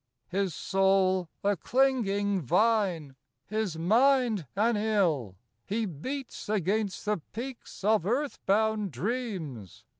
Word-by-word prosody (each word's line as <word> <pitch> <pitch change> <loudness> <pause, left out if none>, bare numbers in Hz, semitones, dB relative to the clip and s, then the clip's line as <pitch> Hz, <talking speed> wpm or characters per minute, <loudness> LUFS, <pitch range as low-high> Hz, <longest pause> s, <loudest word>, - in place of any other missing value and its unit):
His 190 -3 -1
soul, 190 -2 +2
a 205 0 +2
clinging 205 - +1
vine, 180 - +1 0.3
his 215 -5 -2
mind, 225 - +3
an 225 +3 +2
ill, 180 - +1 0.3
He 220 +3 -1
beats 235 - -6
against 205 0 0
the 210 0 +1 0.2
peaks 240 -2 -7
of 215 -3 +3
earth 275 +6 -1
bound 215 0 +2
dreams. 185 - -4
205 Hz, 110 wpm, -29 LUFS, 185-225 Hz, 0.3 s, mind